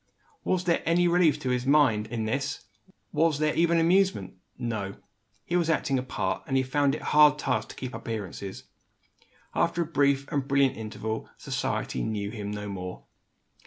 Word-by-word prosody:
Was 185 -1 0
there 175 -2 +1
any 175 +1 +3
relief 175 -3 +3
to 130 - -1
his 125 +1 -1
mind 135 -8 +4
in 110 -1 -3
this? 135 +5 -2 0.5
was 160 -1 +2
there 155 0 +1
even 170 0 +3
amusement? 175 - +2 0.2
No; 105 -5 -3 0.5
he 175 - -2
was 170 -2 +2
acting 135 -4 +1
a - - -1
part, 130 - -2
and 135 - +1
he 130 - +3
found 140 +1 +1
it - - -7
a - - -2
hard 150 0 +7
task 135 -4 -1
to - - -9
keep 130 -1 -6
up 115 - -6
appearances. 100 -4 -6 0.9
After 170 0 +1
a - - -7
brief 140 -3 +1
and 140 -2 -1
brilliant 140 -1 +3
interval, 110 0 -5
society - - -2
knew 105 -2 -2
him 105 -3 -5
no 105 0 -5
more. 90 -2 -6
135 Hz, 180 wpm, -27 LUFS, 110-155 Hz, 0.9 s, hard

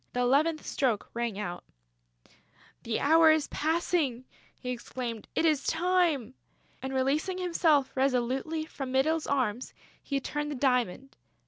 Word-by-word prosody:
The 245 - 0
eleventh 300 +6 +2
stroke 240 -7 -1
rang 235 -3 -2
out. 175 -4 -5 1.2
"The 230 -1 -2
hour 320 +2 +6
is 310 -2 +3
passing!" 310 -5 0 0.3
he 250 - -5
exclaimed. 235 -2 -5
"It - - +2
is 305 -4 +2
time!" 325 -8 +1 0.5
And 265 - -4
releasing 280 +8 0
himself 330 -6 +2
resolutely 265 +4 0
from 270 -4 -6
Mytyl's 305 +5 +1
arms, 255 -4 -1 0.3
he 275 -1 -2
turned 295 +2 -3
the 295 - -3
diamond.... 250 -1 0
275 Hz, 130 wpm, -29 LUFS, 250-315 Hz, 1.2 s, hour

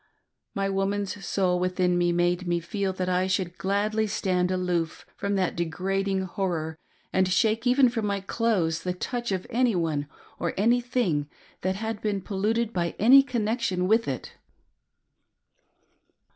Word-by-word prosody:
My 195 0 0
woman's 195 +1 -1
soul 180 -1 +1
within 180 0 +1
me 175 0 +2
made 175 +1 +1
me 175 0 +1
feel 195 +3 -2
that 185 -1 -3
I 185 +1 +1
should 185 -2 -1
gladly 210 +4 0
stand 185 -3 0
aloof 180 -3 -1
fropi 200 0 -2
that 185 -2 0
degrading 190 +3 -1
horror, 175 -4 -3 0.3
and 190 0 +3
shake 225 +4 +2
even 255 +1 +5
from 225 -3 -1
my 200 -1 0
clotheg, 190 -6 0
the 180 - -2
touch 240 +2 -3
of 185 -1 -2
any 240 -2 +2
one, 155 -4 -1 0.3
or 170 - -2
anything, 235 - +1 0.3
that 185 +1 0
had 220 +1 -4
been 205 -2 -1
polluted 215 +4 -1
by 170 -2 -1
any 260 +6 +8
connection 225 -7 -1
with 225 +3 +3
it. - - -4
195 Hz, 145 wpm, -26 LUFS, 180-215 Hz, 0.3 s, any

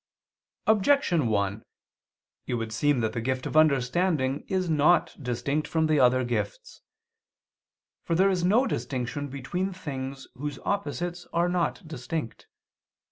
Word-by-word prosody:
Objection 215 - +3
1: 100 0 0 0.8
It - - -2
would 115 -1 -4
seem 145 +2 +2
that 110 -1 -1
the 115 - -2
gift 130 +2 -2
of - - -4
understanding 145 0 +2
is 185 -1 0
not 155 +2 +3
distinct 140 +4 -1
from 160 -1 +1
the 155 -2 +3
other 130 0 +4
gifts. - - -4 1.2
For 165 - 0
there 195 +3 +4
is 180 -2 0
no 215 +9 +4
distinction 135 - -3
between 140 +8 -3
things 135 -6 -6
whose 145 +2 -5
opposites 175 -2 -2
are 170 +1 +2
not 175 0 -1
distinct. 160 -5 -5
150 Hz, 135 wpm, -27 LUFS, 130-175 Hz, 1.2 s, other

